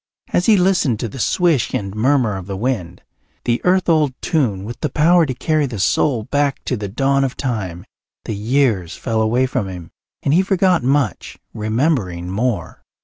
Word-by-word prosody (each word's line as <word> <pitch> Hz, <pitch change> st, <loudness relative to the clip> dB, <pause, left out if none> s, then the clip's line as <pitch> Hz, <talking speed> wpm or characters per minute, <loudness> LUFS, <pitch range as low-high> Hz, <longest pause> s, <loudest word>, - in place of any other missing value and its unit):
As 180 Hz, -, +2 dB
he 215 Hz, -2 st, +6 dB
listened 180 Hz, -, +2 dB
to 120 Hz, -, -2 dB
the 130 Hz, -, -9 dB
swish 165 Hz, -1 st, +1 dB
and 100 Hz, -1 st, -3 dB
murmur 120 Hz, -1 st, +2 dB
of 95 Hz, -1 st, -7 dB
the 100 Hz, -1 st, -4 dB
wind, 95 Hz, -7 st, -3 dB, 0.4 s
the 120 Hz, 0 st, +1 dB
earth 185 Hz, +1 st, +2 dB
old 155 Hz, -6 st, +2 dB
tune 115 Hz, -, 0 dB
with 115 Hz, +3 st, -7 dB
the 150 Hz, -, -1 dB
power 165 Hz, +4 st, +4 dB
to 130 Hz, -, -2 dB
carry 155 Hz, +2 st, 0 dB
the 120 Hz, -4 st, -6 dB
soul 110 Hz, +5 st, +1 dB
back 145 Hz, +3 st, 0 dB
to 125 Hz, -, -1 dB
the 105 Hz, -3 st, -4 dB
dawn 135 Hz, +6 st, +1 dB
of 130 Hz, -2 st, -2 dB
time, 95 Hz, -9 st, -3 dB, 0.4 s
the -, -, -3 dB
years 110 Hz, -4 st, 0 dB
fell 110 Hz, -1 st, -1 dB
away 120 Hz, +4 st, +2 dB
from 125 Hz, -5 st, -2 dB
him 90 Hz, -3 st, -9 dB, 0.3 s
and 140 Hz, -, +2 dB
he 175 Hz, -, +5 dB
forgot 190 Hz, -2 st, +2 dB
much, 130 Hz, -, -1 dB, 0.2 s
remembering 110 Hz, -, -1 dB
more. 115 Hz, +3 st, -2 dB
125 Hz, 185 wpm, -19 LUFS, 105-145 Hz, 0.4 s, he